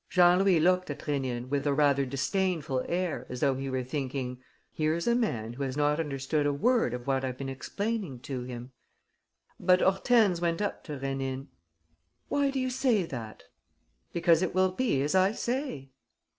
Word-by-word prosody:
Jean 180 0 +5
Louis 190 -3 +4
looked 180 +2 +2
at - - -5
Rénine 130 -5 -2
with 140 +1 -1
a 140 - +2
rather 140 -2 +3
disdainful 150 -1 -1
air, 170 -8 -2
as 125 0 -6
though 140 -2 +3
he 135 +1 -4
were 130 -1 -1
thinking: 130 -1 -4 0.3
"Here's 160 +2 0
a 235 - +3
man 120 - -1
who 130 - -8
has 135 0 -2
not 150 +1 +2
understood 145 0 -1
a - - +2
word 155 - +2
of 120 0 -8
what 135 -1 0
I've 130 -1 -3
been 135 0 -4
explaining 195 - -3
to 130 -2 -4
him." 125 0 -7 0.9
But 180 0 +4
Hortense 195 -1 +3
went 170 0 0
up 205 - -2
to 150 -4 -5
Rénine: 135 0 -3 0.8
"Why 285 -1 +2
do 270 -1 -2
you 255 0 -1
say 250 -6 +2
that?" 115 - -7 0.7
"Because 170 -1 +3
it 185 -1 -1
will 185 0 +3
be 185 - 0
as 145 - 0
I 190 +2 +4
say." 235 - -3
150 Hz, 180 wpm, -29 LUFS, 135-185 Hz, 0.9 s, Jean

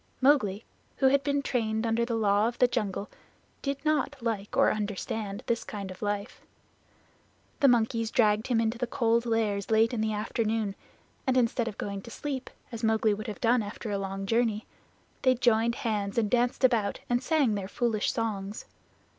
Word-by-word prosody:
Mowgli, 245 -7 +3 0.3
who 265 - +5
had 280 +1 +3
been 285 0 0
trained 220 -3 -1
under 230 +1 +1
the 235 -1 -2
Law 210 -1 +3
of 235 - -4
the 250 - +5
Jungle, 210 -4 -2 0.5
did 275 -1 -2
not 300 -2 +1
like 225 -4 -3
or - - +5
understand 205 0 -3
this 230 -1 0
kind 200 -3 -6
of 185 - -11
life. 205 +1 -3 1.2
The 280 - +5
monkeys 230 -2 +2
dragged 215 -2 +2
him 240 -3 +2
into 225 +1 0
the 245 - -1
Cold 235 0 +1
Lairs 215 -3 0
late 225 +2 +3
in 225 - -1
the 220 0 0
afternoon, 215 0 -1 0.5
and 260 0 +3
instead 235 -1 +2
of 215 - -5
going 200 -1 -4
to 235 - -11
sleep, 270 +1 -5 0.2
as 230 -1 -7
Mowgli 220 -1 +3
would 215 +1 -5
have 215 - -6
done 240 +1 +3
after 210 +1 -6
a 200 - -1
long 195 0 -4
journey, 225 0 +1 0.6
they 255 -1 +4
joined 235 -1 +2
hands 210 -4 -2
and 215 -3 +1
danced 245 +2 +1
about 225 -6 +2
and 245 0 +1
sang 285 -6 +2
their 200 -2 -3
foolish 220 0 0
songs. 210 -2 -3
225 Hz, 180 wpm, -28 LUFS, 210-240 Hz, 1.2 s, who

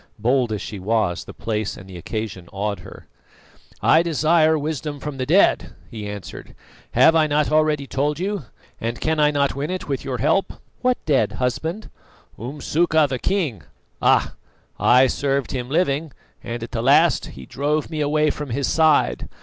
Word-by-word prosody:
Bold 120 +2 +1
as 105 - -3
she 105 - -6
was, 100 -3 0
the - - -9
place 110 -2 -3
and 95 - -12
the 95 - -11
occasion 95 -1 -5
awed 100 +1 -3
her. - - -12 0.8
"I 160 - +6
desire 160 -1 +3
wisdom 150 -1 -4
from 145 0 -6
the 130 -1 -3
dead!" 185 +7 +3 0.2
he 105 -3 -6
answered. 100 -2 -9 0.4
"Have 165 - +6
I 155 -1 +4
not 150 0 +1
already 155 -2 +2
told 145 +2 -1
you, 190 -3 -3 0.3
and 115 +1 -3
can 160 0 0
I 150 0 +5
not 140 -2 0
win 140 +3 -3
it 185 0 -4
with 135 -3 -2
your 130 -2 -3
help?" 155 - +1 0.3
"What 250 0 +2
dead, 145 -4 +2
husband?" 160 - -3 0.5
"Umsuka 150 +5 +1
the 130 -2 -3
king. 155 - -1 0.4
Ah! - - +3 0.5
I 125 +2 +5
served 140 +1 -1
him 125 -1 -4
living, 155 -1 0 0.3
and 115 0 -5
at 115 - -7
the 115 - -2
last 140 +4 +4
he 65 - -9
drove 150 - -2
me 155 -1 -2
away 150 +1 +2
from 150 -1 -6
his 135 +3 -1
side. 160 -2 +2
140 Hz, 175 wpm, -22 LUFS, 120-155 Hz, 0.8 s, I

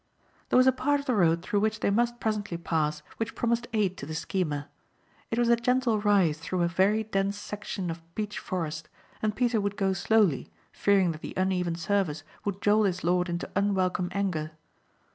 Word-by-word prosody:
There - - +4
was 255 - +6
a 260 - +7
part 285 +3 +1
of 280 - -7
the 255 - +1
road 170 -5 +3
through 205 - 0
which 215 +1 0
they - - +2
must 240 +3 +1
presently 210 -5 -2
pass 155 -3 -1
which 225 0 -3
promised 235 0 0
aid 200 -4 0
to 140 - -7
the 160 - -5
schemer. 155 -4 -2 0.6
It 230 - -2
was 240 0 +3
a 235 - +6
gentle 240 -1 +1
rise 195 -7 +3
through 175 +2 -1
a - - +3
very 195 +5 +2
dense 200 -1 -1
section 205 -3 -5
of 165 0 -7
beech 210 -1 -3
forest 160 -4 -4 0.3
and 215 -1 0
Peter 240 -2 +1
would 200 0 -2
go 195 -2 +1
slowly 190 - +2 0.2
fearing 195 -3 +3
that 155 -1 -8
the - - -7
uneven 185 -2 0
surface 170 -4 -1 0.2
would 200 -1 -3
jolt 210 0 +4
his 185 -1 -3
lord 180 +1 +2
into 175 0 -3
unwelcome 185 -2 +1
anger. 165 -6 -2
195 Hz, 195 wpm, -28 LUFS, 175-215 Hz, 0.6 s, a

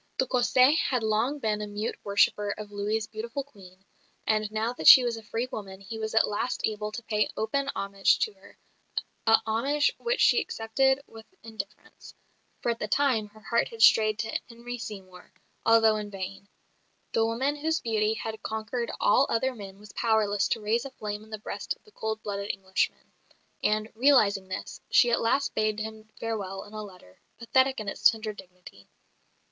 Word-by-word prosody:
De 260 - +2
Cassé 255 +3 +4
had 250 -4 0
long 220 +6 +1
been 215 -5 -1
a 210 - -4
mute 205 +2 -3
worshipper 205 0 +2
of 210 -1 -8
Louis' 210 +2 -1
beautiful 230 +5 -5
"Queen," 195 -8 -17 0.4
and 215 -1 +1
now 220 +2 -1
that - - -2
she 255 - +11
was 240 -1 -1
a 225 - -8
free 225 +3 -3
woman 190 -2 -7
he 220 +3 -7
was 220 0 -3
at 225 - +5
last 210 +4 -2
able 210 -1 -3
to 235 +2 -7
pay 210 -2 0
open 275 +6 -1
homage 195 0 +2
to 435 - -1
her, - - -19 0.7
a 225 0 +7
homage 275 +7 +1
which 475 +1 -1
she - - +5
accepted 265 +5 +1
with 225 -1 -14 0.2
indifference, 210 -2 -9 0.5
for 235 - +2
at 230 - -4
the 210 - -2
time 245 -4 +2
her 215 +1 -18
heart 235 +1 +1
had 230 - -11
strayed 215 -1 +6
to 220 0 -2
Henry 240 +1 -7
Seymour, 190 -5 -9 0.4
although 225 -1 +5
in 210 -1 -5
vain. 195 0 -7 0.7
The 225 - +3
woman 260 +6 0
whose 320 +2 0
beauty 220 -1 0
had 220 -1 -5
conquered 220 +2 -3
all 275 - +4
other 260 +3 +1
men 195 -4 -10
was 210 +1 -14
powerless 210 -3 +2
to 225 - -1
raise 220 +3 +1
a 275 - -6
flame 210 -5 -6
in 220 - -17
the 215 - -5
breast 210 - -5
of - - -34
the 425 - -20
cold 220 - -4
blooded 200 0 -4
Englishman; 190 -1 -2 0.5
and, 215 0 +1
realising 220 -6 +4
this, 185 - -6
she 240 - +5
at - - +2
last 270 +5 +1
bade 215 0 0
him 220 0 -7
farewell 200 -4 -4
in 210 - -15
a 215 - -5
letter, 180 - -13 0.2
pathetic 260 +2 +2
in 215 - -6
its 195 - -5
tender 220 -1 -4
dignity. 180 - -15
220 Hz, 185 wpm, -28 LUFS, 205-235 Hz, 0.7 s, she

